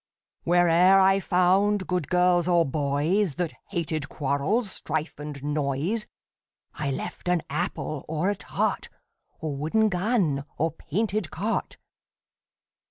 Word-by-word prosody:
Where 175 Hz, +1 st, +4 dB
e'er 180 Hz, +4 st, +6 dB
I 195 Hz, 0 st, +5 dB
found 190 Hz, +2 st, +2 dB
good 180 Hz, -5 st, -2 dB
girls 180 Hz, -1 st, +3 dB
or 170 Hz, -2 st, +4 dB
boys, 150 Hz, +5 st, 0 dB
That 175 Hz, 0 st, -2 dB, 0.2 s
hated 160 Hz, -5 st, -2 dB
quarrels, 155 Hz, -, 0 dB
strife 155 Hz, -1 st, -3 dB
and 145 Hz, -1 st, -6 dB
noise, 150 Hz, +8 st, -1 dB, 0.7 s
I 140 Hz, -, -3 dB
left 135 Hz, -, -5 dB
an 180 Hz, -2 st, +2 dB
apple, 155 Hz, -5 st, -3 dB
or 160 Hz, +5 st, 0 dB
a -, -, -2 dB
tart, -, -, -2 dB, 0.5 s
Or 155 Hz, -3 st, -3 dB
wooden 185 Hz, +10 st, +1 dB
gun, 180 Hz, -, +1 dB
or 165 Hz, +2 st, +1 dB
painted 200 Hz, +3 st, -2 dB
cart. 205 Hz, +10 st, -3 dB
175 Hz, 125 wpm, -26 LUFS, 150-195 Hz, 0.7 s, e'er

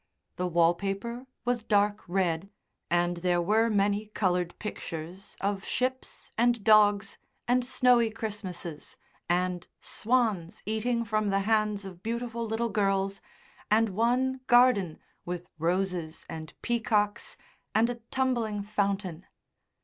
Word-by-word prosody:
The 180 Hz, -, 0 dB
wallpaper 195 Hz, +8 st, 0 dB, 0.2 s
was 245 Hz, -1 st, +1 dB
dark 205 Hz, -1 st, +2 dB
red, 175 Hz, 0 st, 0 dB, 0.4 s
and 175 Hz, 0 st, +1 dB
there 175 Hz, 0 st, +1 dB
were 220 Hz, +6 st, +3 dB
many 205 Hz, 0 st, +1 dB
coloured 180 Hz, -4 st, 0 dB
pictures 175 Hz, -2 st, -6 dB
of 200 Hz, 0 st, -1 dB
ships 260 Hz, +1 st, -2 dB
and 240 Hz, -2 st, +3 dB
dogs 205 Hz, -2 st, +4 dB, 0.3 s
and 250 Hz, +1 st, +3 dB
snowy 245 Hz, -2 st, +4 dB
Christmases, 200 Hz, -8 st, -6 dB, 0.3 s
and 180 Hz, 0 st, 0 dB
swans 215 Hz, -8 st, 0 dB
eating 230 Hz, +3 st, 0 dB
from 215 Hz, -1 st, 0 dB
the 195 Hz, 0 st, +2 dB
hands 210 Hz, -1 st, +1 dB
of 180 Hz, -2 st, -9 dB
beautiful 235 Hz, +1 st, -3 dB
little 225 Hz, +2 st, -1 dB
girls, 195 Hz, -2 st, 0 dB, 0.5 s
and 220 Hz, +1 st, +4 dB
one 250 Hz, +6 st, +1 dB
garden 240 Hz, -9 st, +5 dB, 0.3 s
with 180 Hz, 0 st, -5 dB
roses 175 Hz, -1 st, -1 dB
and 160 Hz, -1 st, -8 dB
peacocks 220 Hz, -3 st, 0 dB, 0.4 s
and 225 Hz, +2 st, +5 dB
a 245 Hz, -, -2 dB
tumbling 235 Hz, -6 st, 0 dB
fountain. 195 Hz, -4 st, -2 dB
205 Hz, 120 wpm, -29 LUFS, 180-230 Hz, 0.5 s, garden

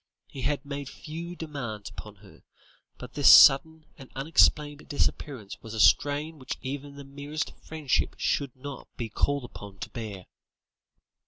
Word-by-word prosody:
He 135 Hz, -, -9 dB
had 140 Hz, +2 st, -1 dB
made 140 Hz, -1 st, -5 dB
few 170 Hz, +3 st, -8 dB
demands 135 Hz, -11 st, -6 dB
upon 105 Hz, -1 st, -10 dB
her, 95 Hz, -, -17 dB, 0.6 s
but -, -, -10 dB
this -, -, +5 dB
sudden 160 Hz, +3 st, +7 dB
and 135 Hz, -, -12 dB
unexplained 145 Hz, +1 st, +2 dB
disappearance 135 Hz, -6 st, -2 dB
was 110 Hz, 0 st, -8 dB
a -, -, -4 dB
strain 145 Hz, +6 st, +3 dB
which 130 Hz, -, -5 dB
even 140 Hz, +1 st, -6 dB
the 140 Hz, -, -9 dB
merest 145 Hz, +3 st, -5 dB
friendship 155 Hz, -4 st, -1 dB
should 140 Hz, -4 st, -1 dB
not 135 Hz, 0 st, -9 dB
be 115 Hz, -2 st, -4 dB
called 140 Hz, +5 st, 0 dB
upon 100 Hz, -4 st, -11 dB
to -, -, -7 dB
bear. 105 Hz, -6 st, -7 dB
140 Hz, 150 wpm, -27 LUFS, 120-150 Hz, 0.6 s, sudden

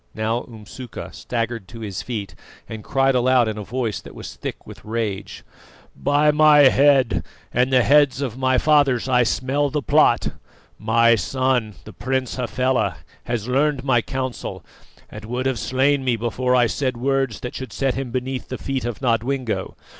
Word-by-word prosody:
Now 110 Hz, +2 st, -1 dB
Umsuka 115 Hz, +2 st, -9 dB
staggered 115 Hz, -4 st, -4 dB
to 115 Hz, -1 st, -11 dB
his 100 Hz, -4 st, -5 dB
feet, 105 Hz, -7 st, -5 dB, 0.3 s
and 110 Hz, -1 st, -8 dB
cried 135 Hz, 0 st, +2 dB
aloud 125 Hz, -1 st, +3 dB
in 110 Hz, -1 st, -3 dB
a -, -, -5 dB
voice 115 Hz, 0 st, -3 dB
that -, -, -13 dB
was -, -, -8 dB
thick -, -, -7 dB
with -, -, -12 dB
rage: 105 Hz, -3 st, -4 dB, 0.5 s
"By 145 Hz, +1 st, +2 dB
my 150 Hz, 0 st, +6 dB
head 135 Hz, -3 st, +3 dB, 0.3 s
and 125 Hz, +2 st, +2 dB
the 130 Hz, -2 st, +4 dB
heads 145 Hz, -1 st, +4 dB
of 130 Hz, -5 st, -3 dB
my 130 Hz, 0 st, +1 dB
fathers 140 Hz, -4 st, +3 dB
I 125 Hz, -1 st, +3 dB
smell 135 Hz, +4 st, 0 dB
the 145 Hz, +1 st, -2 dB
plot! -, -, +3 dB, 0.5 s
My 115 Hz, +2 st, +4 dB
son, 125 Hz, -1 st, 0 dB
the 110 Hz, -, -11 dB
Prince 130 Hz, +5 st, -2 dB
Hafela, 125 Hz, +1 st, 0 dB, 0.3 s
has 115 Hz, -2 st, -3 dB
learned 140 Hz, +1 st, +1 dB
my 130 Hz, -4 st, +3 dB
counsel, 130 Hz, 0 st, -5 dB, 0.4 s
and 105 Hz, -, -10 dB
would 125 Hz, +3 st, -3 dB
have 130 Hz, -3 st, 0 dB
slain 135 Hz, +2 st, +1 dB
me 125 Hz, -2 st, +1 dB
before 125 Hz, +3 st, 0 dB
I 125 Hz, -1 st, +4 dB
said 130 Hz, +2 st, -2 dB
words 135 Hz, -1 st, -1 dB
that 125 Hz, -, -5 dB
should 130 Hz, -4 st, -7 dB
set 135 Hz, +4 st, 0 dB
him 135 Hz, -2 st, -4 dB
beneath 130 Hz, +1 st, -4 dB
the 130 Hz, -, -4 dB
feet 135 Hz, -3 st, -3 dB
of 120 Hz, +2 st, -5 dB
Nodwengo. 120 Hz, 0 st, -1 dB
125 Hz, 170 wpm, -22 LUFS, 115-135 Hz, 0.5 s, my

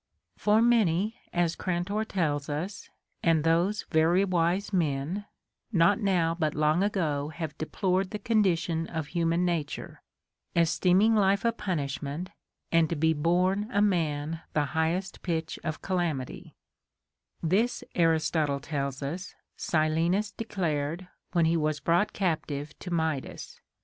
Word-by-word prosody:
27. -, -, -29 dB
For 215 Hz, +3 st, +4 dB
many, 215 Hz, -2 st, +2 dB, 0.2 s
as 175 Hz, -1 st, +1 dB
Grantor 185 Hz, +4 st, -1 dB
tells 155 Hz, -8 st, -1 dB
us, 170 Hz, +7 st, -4 dB, 0.3 s
and 165 Hz, -3 st, +3 dB
those 170 Hz, +6 st, +2 dB
very 170 Hz, +4 st, +4 dB
wise 185 Hz, +2 st, 0 dB
men, 165 Hz, +3 st, 0 dB, 0.5 s
not 180 Hz, +2 st, +4 dB
now 180 Hz, -6 st, +2 dB
but 155 Hz, -3 st, -1 dB
long 155 Hz, +3 st, +2 dB
ago 155 Hz, -8 st, 0 dB
have 160 Hz, -2 st, -5 dB
deplored 185 Hz, +3 st, 0 dB
the 210 Hz, -, -4 dB
condition 175 Hz, -7 st, +1 dB
of 160 Hz, -2 st, -3 dB
human 170 Hz, 0 st, +1 dB
nature, 165 Hz, -5 st, -3 dB, 0.5 s
esteeming 180 Hz, +5 st, +4 dB
life 200 Hz, 0 st, +3 dB
a 230 Hz, -, +4 dB
punishment, 160 Hz, -, -3 dB, 0.4 s
and 165 Hz, -2 st, +4 dB
to 170 Hz, -, -1 dB
be 160 Hz, +1 st, +2 dB
born 180 Hz, +7 st, +1 dB
a 205 Hz, -, +1 dB
man 165 Hz, -5 st, 0 dB
the 150 Hz, -1 st, +2 dB
highest 170 Hz, +4 st, -1 dB
pitch 165 Hz, -2 st, -2 dB
of 155 Hz, -2 st, -4 dB
calamity; 170 Hz, -9 st, -2 dB, 0.9 s
this, 200 Hz, +9 st, +1 dB
Aristotle 160 Hz, -3 st, +2 dB
tells 140 Hz, -2 st, -3 dB
us, 175 Hz, +6 st, -5 dB, 0.2 s
Silenus 165 Hz, +6 st, +1 dB
declared 170 Hz, -5 st, -2 dB, 0.3 s
Avhen 170 Hz, -1 st, +4 dB
he 165 Hz, +1 st, +3 dB
was 155 Hz, -1 st, 0 dB
brought 170 Hz, +7 st, +2 dB
captive 155 Hz, -5 st, -2 dB
to 180 Hz, -, -7 dB
Midas. 160 Hz, -5 st, -3 dB
170 Hz, 130 wpm, -28 LUFS, 155-190 Hz, 0.9 s, For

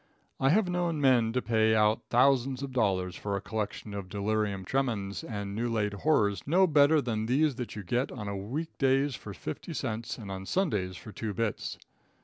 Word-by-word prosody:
I 135 Hz, -, +3 dB
have 195 Hz, +5 st, +4 dB
known 175 Hz, -3 st, 0 dB
men 125 Hz, -5 st, +4 dB
to 125 Hz, -, 0 dB
pay 110 Hz, -1 st, +3 dB
out 105 Hz, 0 st, +2 dB
thousands 130 Hz, +1 st, +3 dB
of 140 Hz, -, -4 dB
dollars 95 Hz, -7 st, +1 dB
for 100 Hz, -1 st, -3 dB
a -, -, -3 dB
collection 105 Hz, 0 st, -4 dB
of 100 Hz, -2 st, -5 dB
delirium 100 Hz, -1 st, -1 dB
tremens 110 Hz, -, -1 dB
and 100 Hz, -8 st, -5 dB
new 120 Hz, +3 st, -1 dB
laid 105 Hz, -3 st, 0 dB
horrors 100 Hz, -, +2 dB
no 180 Hz, +6 st, +5 dB
better 150 Hz, -1 st, +5 dB
than 110 Hz, -2 st, -2 dB
these 145 Hz, +4 st, +3 dB
that 120 Hz, -6 st, -5 dB
you 105 Hz, -, -5 dB
get 120 Hz, +9 st, -1 dB
on 100 Hz, -4 st, -5 dB
week 160 Hz, +5 st, -4 dB
days 135 Hz, +1 st, +3 dB
for 105 Hz, -, -7 dB
fifty 120 Hz, -, -6 dB
cents 115 Hz, -4 st, -3 dB
and 105 Hz, -4 st, -8 dB
on 95 Hz, 0 st, -6 dB
Sundays 105 Hz, -, 0 dB
for 110 Hz, -, -10 dB
two 105 Hz, -1 st, -4 dB
bits. 115 Hz, -1 st, -2 dB
115 Hz, 190 wpm, -29 LUFS, 100-135 Hz, -, no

